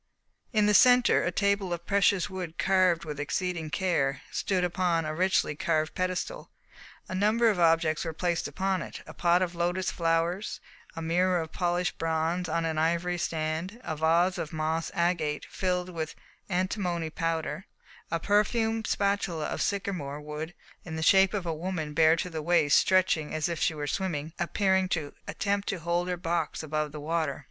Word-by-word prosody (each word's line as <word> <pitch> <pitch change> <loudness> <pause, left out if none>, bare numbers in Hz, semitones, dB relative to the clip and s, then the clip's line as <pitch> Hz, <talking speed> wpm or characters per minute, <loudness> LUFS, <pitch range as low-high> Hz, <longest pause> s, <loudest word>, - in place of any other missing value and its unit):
In 215 -3 +3
the 210 - +3
centre 250 +3 +6
a 180 - 0
table 200 -1 +1
of 170 0 -4
precious 200 0 +3
wood 185 -4 -6
carved 185 -3 +3
with 150 -2 -6
exceeding 165 +2 -2
care, 150 -7 0
stood 185 -2 0
upon 175 -2 +1
a 155 - -2
richly 185 -1 +1
carved 155 -1 0
pedestal. 185 - -3 0.6
A - - -6
number 215 +5 +3
of 195 - -3
objects 165 -2 +3
were 165 - -3
placed 170 +1 -1
upon 190 -1 -1
it: - - -8
a - - -10
pot 175 +1 +3
of 180 -1 -3
lotus 175 +2 -1
flowers, 170 +4 0 0.4
a 165 - -5
mirror 180 +2 +2
of 160 -1 -5
polished 175 +1 -1
bronze 165 +2 0
on 165 0 0
an 160 -1 -1
ivory 170 +2 0
stand, 160 +6 -2
a 160 - -3
vase 165 +4 +2
of 155 - -4
moss 160 +1 -1
agate 170 -4 0
filled 180 -1 -2
with 165 -3 -5 0.3
antimony 180 -3 -1
powder, 165 +2 -2 0.4
a 165 - -1
perfume 220 +4 +1
spatula 200 -7 0
of - - -3
sycamore 180 -8 -2
wood 150 +3 -6 0.3
in 160 -2 -6
the 160 - -2
shape 190 +3 +5
of 195 -3 -2
a 165 - -1
woman 160 -2 -4
bare 160 +1 +5
to 175 +2 -3
the 160 -1 -4
waist 155 -3 +4
stretching 185 -5 +2
out - - -6
as 155 -1 0
if 170 -2 -3
she 160 - +1
were 145 -1 -3
swimming, 160 -1 -2
and 175 - -1
appearing 190 -2 +2
to 155 -5 -2
attempt 200 0 -1
to 195 - -1
hold 170 +1 -1
her 180 -1 -2
box 170 -2 -2
above 155 -1 -2
the 150 - -7
water. 155 -2 -1
175 Hz, 180 wpm, -28 LUFS, 160-185 Hz, 0.6 s, centre